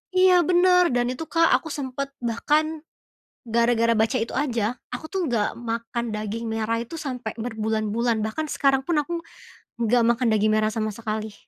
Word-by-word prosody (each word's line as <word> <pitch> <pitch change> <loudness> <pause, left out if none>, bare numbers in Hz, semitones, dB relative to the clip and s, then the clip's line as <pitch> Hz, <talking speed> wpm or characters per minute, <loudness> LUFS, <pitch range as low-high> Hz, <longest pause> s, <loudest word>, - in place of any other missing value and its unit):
iya 370 0 +6
benar 360 0 +4
dan 245 0 +1
itu, 320 +5 -5
Kak, 330 0 +3
aku 320 - -9
sempat 275 0 -4
bahkan, 300 +7 0 0.7
gara-gara 230 0 +3
baca 225 +4 +2
itu 230 - -4
aja, 240 -4 -1 0.2
aku 315 - -6
tuh 385 - -1
nggak 230 -5 +1 0.2
makan 230 +1 -3
daging 215 +2 -4
merah 225 +1 -1
itu, 240 - -10
sampai 250 -4 -4
berbulan-bulan, 220 0 -1
bahkan 310 +9 -3
sekarang 270 -1 +2
pun 340 -3 +1
aku 345 - -8 0.7
nggak 235 +1 +3
makan 240 0 +1
daging 215 0 +2
merah 215 0 +2
sama 215 -1 -2
sekali, 215 -1 -4
235 Hz, 160 wpm, -24 LUFS, 220-290 Hz, 0.7 s, iya